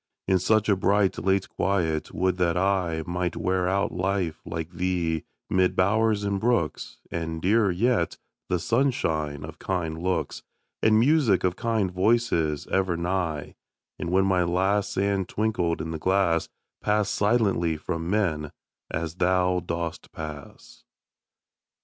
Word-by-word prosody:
In 95 -1 +3
such 110 +3 +2
a 100 - +4
bright, 100 +1 +2
late 95 0 +1
quiet, 85 -6 -1
would 90 +1 0
that 90 -1 +1
I 90 -4 +1
Might 90 0 -2
wear 90 0 0
out 100 +1 +1
life 90 -1 -1
like 80 0 -4
thee, 85 -2 -1 0.2
mid 95 -1 +2
bowers 105 +2 +2
and 100 -1 0
brooks, 115 -8 -1
And, 80 -1 -3
dearer 105 +4 +3
yet, 95 -1 +1 0.3
the 90 - +2
sunshine 85 - 0
of 80 +1 -9
kind 80 -4 -2
looks, 85 -5 -1 0.4
And 110 0 +5
music 120 - +3
of 90 -1 +1
kind 110 -5 0
voices 90 -7 +1
ever 95 -3 +1
nigh; 85 -4 -2 0.5
And - - -3
when 95 +2 +3
my 95 -2 +2
last 95 +4 +1
sand 100 -1 0
twinkled 105 -6 0
in 80 0 -4
the 80 - -4
glass, 95 -2 +1 0.3
Pass 105 -1 +1
silently 100 -8 +1
from 85 +1 -4
men, 80 -8 0 0.4
as 80 +2 -4
thou 90 0 +2
dost 85 -1 -5
pass. 75 -3 -9
90 Hz, 140 wpm, -26 LUFS, 85-100 Hz, 0.5 s, And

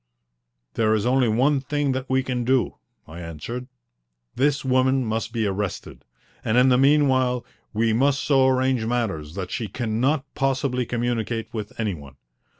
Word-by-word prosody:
"There 110 -1 +2
is 105 - -1
only 125 0 +3
one 135 +6 +2
thing 145 +1 -1
that 130 0 -3
we 130 0 +2
can 125 -2 -2
do," 130 +1 +1 0.3
I 80 +2 -9
answered. 90 +10 -6 0.7
"This 140 +1 +1
woman 130 0 +2
must 110 +1 -2
be 115 -2 -1
arrested, 100 -1 -4 0.4
and 110 - +1
in 125 +1 +6
the 125 - +4
meanwhile 130 -3 +3 0.3
we 110 +1 +1
must 140 +4 +2
so 135 -2 +4
arrange 130 -2 +2
matters 100 -10 -2
that 95 -2 -5
she 115 - -3
cannot 120 +7 0
possibly 130 -3 0
communicate 120 -1 -2
with 105 -1 -6
any 110 -3 0
one. 70 -5 -11
125 Hz, 155 wpm, -24 LUFS, 110-130 Hz, 0.7 s, in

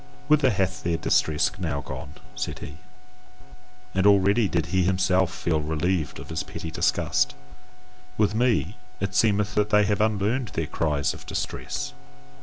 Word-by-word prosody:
"Whither 150 -3 +5
hath 95 -4 -1
their 85 -1 0
distress 80 -2 +2
now 75 -6 -2
gone?" 65 +2 -7 0.2
said - - -3
he, 75 +1 -9 1.2
and 95 +1 +3
already 100 +2 +4
did 85 -4 0
he 95 - +3
himself 90 0 +2
feel 80 -3 -1
relieved 80 +2 -1
of - - -10
his 80 - -2
petty 80 - -7
disgust 65 -3 +1 0.8
"with 105 -1 +2
me, 115 -3 +1 0.2
it 95 -1 -2
seemeth 105 0 +2
that 105 0 +1
they 105 -1 +4
have 105 0 +1
unlearned 110 +4 +1
their 80 - 0
cries 75 -2 0
of - - -12
distress! 65 - -4
95 Hz, 150 wpm, -25 LUFS, 80-105 Hz, 1.2 s, Whither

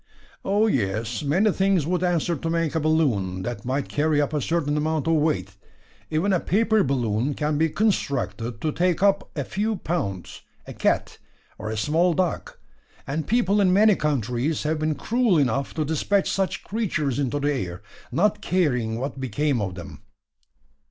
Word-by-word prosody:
"Oh, 205 +3 +2
yes; 115 - -1
many 180 +9 +2
things 190 -5 +2
would 180 +1 0
answer 175 -1 +1
to 165 +3 -4
make 165 -2 0
a 160 - +1
balloon, 120 - +1
that 120 -2 -5
might 135 +2 -1
carry 150 0 +1
up 145 +1 0
a 150 - 0
certain 150 -1 0
amount 155 0 0
of 165 - +2
weight. 125 - 0 0.5
Even 170 +6 +1
a 180 - +3
paper 220 +4 +2
balloon 125 0 0
can 150 -1 -1
be 160 0 +3
constructed 140 - -1
to 155 - 0
take 175 +2 0
up 200 -1 +2
a 145 - -1
few 215 +9 -1
pounds 125 - -4 0.2
a - - -8
cat, - - 0 0.4
or 110 - -4
a 110 - -3
small 165 +9 +2
dog; 180 -1 -1 0.5
and 150 +3 -3
people 210 -3 +2
in 185 -2 +4
many 210 +2 +5
countries 140 - -1
have 155 +1 -1
been 155 0 0
cruel 225 - +1
enough 135 -1 +1
to 155 -2 0
dispatch 175 +6 +1
such 195 -1 -1
creatures 155 - -1
into 140 +1 -1
the 145 +1 +1
air, 95 -7 -4 0.3
not 210 +3 +1
caring 125 - 0
what 135 +2 -4
became 135 -1 0
of 95 -3 -3
them." 85 -3 -10
155 Hz, 170 wpm, -24 LUFS, 130-180 Hz, 0.5 s, many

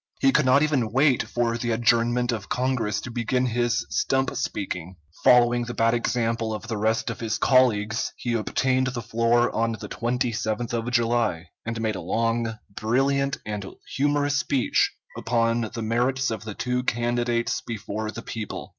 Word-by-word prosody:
He 135 - +4
could 150 -2 +3
not 140 +3 +5
even 135 -8 +1
wait 135 +1 +3
for 120 -1 -1
the 120 - -2
adjournment 120 +1 +2
of 110 -4 -5
Congress 125 -5 0
to 125 - -7
begin 125 +2 0
his 120 -1 0
stump 135 -1 +1
speaking. 90 -3 -4 0.3
Following 120 0 +5
the 120 - -6
bad 115 0 +3
example 115 -2 0
of 110 +1 -8
the 110 -1 -3
rest 110 +2 0
of 115 - -8
his 110 -1 -1
colleagues, 115 -4 +2
he 120 - -2
obtained 130 +3 +1
the 125 -2 -4
floor 115 +2 +2
on 115 0 0
the 110 - -7
27th 120 -1 -2
of 115 0 -1
July, 115 -8 +1 0.2
and 115 -1 -3
made 110 -2 -1
a - - -5
long, 115 0 -1
brilliant, 135 +6 +1
and 105 -2 -4 0.3
humorous 145 +1 +1
speech 135 -3 +1 0.2
upon 115 -1 0
the 115 - -3
merits 125 +3 +1
of 110 -1 -5
the 105 -2 -6
two 125 0 -1
candidates 120 -1 0
before 110 -1 -4
the 115 +2 -7
people. 110 -3 -6
120 Hz, 165 wpm, -25 LUFS, 115-125 Hz, 0.3 s, not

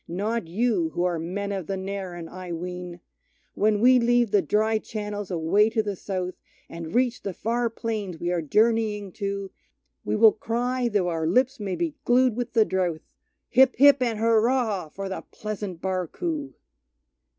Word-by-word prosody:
Not 210 +4 -2
you, 240 - +1
who 175 - 0
are 175 -2 0
men 200 +5 -3
of 190 -5 -4
the 195 - -2
Narran, 190 -3 -5
I 185 +1 -8
ween! 180 +1 -6 0.5
When 210 0 +2
we 250 +3 +6
leave 240 -2 +2
the 205 - +4
dry 220 +1 +1
channels 205 -2 -5
away 185 +5 +3
to 225 -1 0
the 205 -2 -3
south, 185 -1 -4 0.3
And 165 +1 -7
reach 245 -1 +1
the 195 -3 -5
far 235 +1 0
plains 215 -6 -4
we 175 - -1
are 175 -1 0
journeying 210 +3 +1
to, 200 0 -4 0.5
We - - -1
will 220 0 +7
cry, 245 +2 -1
though 200 -5 +1
our 165 -2 -1
lips 255 +9 +2
may 195 -3 -3
be 335 -3 -2
glued 250 -1 +3
with 245 0 -4
the 225 -2 +5
drouth, 180 -5 -1 0.5
Hip, 260 +1 +5
hip, 285 +2 +7
and 235 -3 0
hurrah 225 -4 +2
for 195 +5 -6
the 190 - -4
pleasant 205 -5 -6
Barcoo! 275 - -3
210 Hz, 170 wpm, -25 LUFS, 180-235 Hz, 0.5 s, will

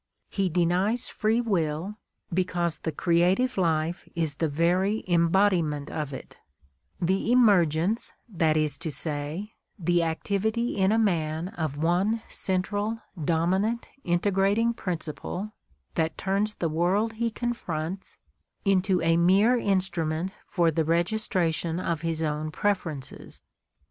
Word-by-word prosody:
"^He 195 -3 0
denies 185 +8 +1
"free 220 +2 +1
will" 175 -4 -1 0.4
because 175 -2 0
the 160 - -3
creative 180 - +2
life 165 -1 0
is 160 -3 0
the 160 +3 -1
very 180 +7 +1
embodiment 170 -4 +2
of 150 -3 -3
it 130 - -9 0.3
— - - -45 0.3
the 190 +6 +1
emergence, 200 -4 +3 0.2
that 165 -7 +1
is 155 -1 0
to 160 - -4
say, 155 +7 -3 0.2
the 175 -2 +2
activity 205 +8 -1
in 190 -1 +3
a 220 - +3
man 170 -5 0
of 160 -8 -4
one 185 +8 +1
central, 205 +4 -1 0.2
dominant, 190 +9 0
integrating 195 +6 +2
principle 180 +1 -4 0.4
that 160 0 -1
turns 200 +2 0
the 170 - -1
world 180 +8 +1
he 230 +1 -1
confronts 190 -7 -4 0.5
into 190 -1 +2
a 165 0 +3
mere 195 +8 +5
instrument 185 -5 0
for 170 -3 +2
the 160 +1 +1
registration 170 -1 +1
of 170 -3 -2
his 165 -1 -1
own 155 0 -2
preferences. 160 -6 -3
175 Hz, 125 wpm, -27 LUFS, 160-205 Hz, 0.5 s, mere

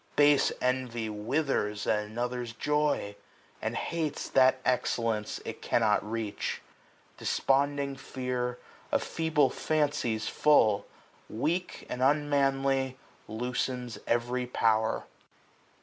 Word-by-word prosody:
Base 145 -1 +5
envy 125 -3 0
withers 105 -2 -1
at 105 -1 +2
another's 120 +2 -3
joy. 150 -5 0 0.5
And - - -2
hates 160 -3 -2
that 130 0 +5
excellence 115 -3 0
it - - -6
cannot 105 -3 +2
reach. 110 -1 -3 0.6
Desponding 140 0 +1
fear, 125 -2 -3 0.3
of - - +2
feeble 155 -4 +1
fancies 145 -8 0
full, 110 -9 +4 0.4
285 - - -9
Weak 175 +7 -1
and 125 - -4
unmanly, 135 -2 +2 0.3
loosens 125 0 -3
every 120 +1 0
power. 110 -2 +1
125 Hz, 100 wpm, -29 LUFS, 115-140 Hz, 0.6 s, Base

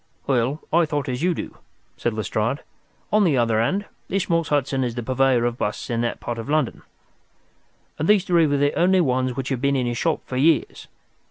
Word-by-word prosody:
"Well, 135 +3 0
I 170 0 +5
thought 145 -2 -2
as 125 0 -3
you 175 0 +1
do," - - -7 0.4
said - - -2
Lestrade. - - -2 0.5
"On 215 0 +5
the 155 -8 +3
other 115 -2 +2
hand, 195 - 0 0.2
this 195 0 -1
Morse 165 -2 +2
Hudson 135 -2 0
is 120 -2 -3
the 120 - -4
purveyor 130 -1 +2
of 120 0 -2
busts 105 +4 -3
in 115 0 0
that 120 - -2
part 120 -1 -4
of 115 - -6
London, 150 -4 0 1.2
and 155 - 0
these 210 -3 +5
three 170 -4 +3
were 145 0 +1
the 145 +1 +2
only 185 +2 +3
ones 130 -5 +1
which 135 0 -3
had 130 -3 -2
been 140 0 +2
in 130 -2 0
his 120 -1 -2
shop 165 -2 0
for 130 - -4
years. 150 +1 +1
135 Hz, 210 wpm, -23 LUFS, 125-165 Hz, 1.2 s, I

